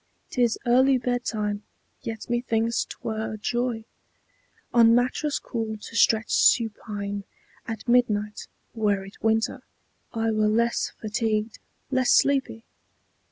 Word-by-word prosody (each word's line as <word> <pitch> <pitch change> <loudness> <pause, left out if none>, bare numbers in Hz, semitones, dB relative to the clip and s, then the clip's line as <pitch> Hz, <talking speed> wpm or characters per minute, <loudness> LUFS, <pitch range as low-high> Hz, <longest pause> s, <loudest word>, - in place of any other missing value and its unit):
'T 250 - -1
is 235 -2 +3
early 260 +2 +4
bedtime, 225 -4 -2 0.4
yet 225 -1 -6
methinks 235 -1 0
't - - -9
were 220 -1 -3
joy 240 0 -2 0.9
On 230 -1 +6
mattress 260 +4 +1
cool 225 -3 -4
to 210 - -11
stretch 220 -1 +3
supine. 205 -3 +1 0.4
At 225 +1 -6
midnight, 210 -4 +1 0.3
Were 205 -3 0
it 195 - -14
winter, 220 0 +1 0.5
I 225 -1 0
were 215 -1 +2
less 235 +2 +1
fatigued, 215 0 -1 0.3
less 260 -1 +2
sleepy. 270 -5 +2
225 Hz, 115 wpm, -25 LUFS, 215-240 Hz, 0.9 s, On